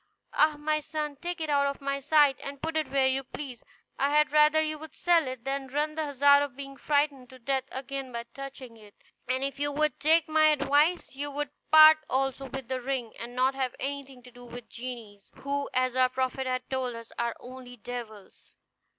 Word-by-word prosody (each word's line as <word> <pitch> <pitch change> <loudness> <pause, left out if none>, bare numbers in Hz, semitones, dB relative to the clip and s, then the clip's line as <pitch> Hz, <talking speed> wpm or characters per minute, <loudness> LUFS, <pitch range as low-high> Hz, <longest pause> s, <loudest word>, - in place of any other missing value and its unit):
Ah! 305 0 +4
my 305 +1 0
son, 300 -1 -4
take 350 +4 -5
it 315 - -2
out 280 -1 +3
of 280 - -3
my 275 0 -2
sight, 290 0 +4
and 280 0 -7
put 320 +2 -4
it 310 -4 0
where 270 0 +2
you 265 +1 +1
please. 255 -2 -8 0.4
I 275 - +2
had 300 0 +3
rather 300 +1 +5
you 310 -1 -1
would 315 -1 -11
sell 340 -4 +3
it 255 -2 -6
than 270 0 -2
run 295 +3 -1
the 315 0 -2
hazard 285 0 +5
of 285 -3 -3
being 275 0 -8
frightened 285 -3 0
to 260 - -13
death 265 +1 -1
again 270 0 -5
by 235 -1 -4
touching 270 -4 -9
it; 210 -2 -17 0.3
and 260 +1 0
if 275 0 -4
you 290 0 0
would 305 +1 0
take 315 +2 +4
my 310 0 +4
advice 295 +2 +2
you 290 +1 -3
would 290 0 -4 0.2
part 310 0 +9
also 270 +1 -1
with 265 -1 -6
the 260 0 -3
ring, 250 -3 -3
and 240 +1 -7
not 260 +2 +2
have 265 -2 -2
anything 275 -2 -5
to 250 - -14
do 245 0 -14
with 245 0 -10
genies, 230 -5 -8
who, 280 0 -3
as 255 0 0
our 255 0 +4
prophet 260 +1 -2
has 255 0 -1
told 255 -2 -2
us, 230 0 -10
are 235 -1 -1
only 250 0 -11
devils." 220 -3 -9
275 Hz, 210 wpm, -28 LUFS, 255-295 Hz, 0.4 s, part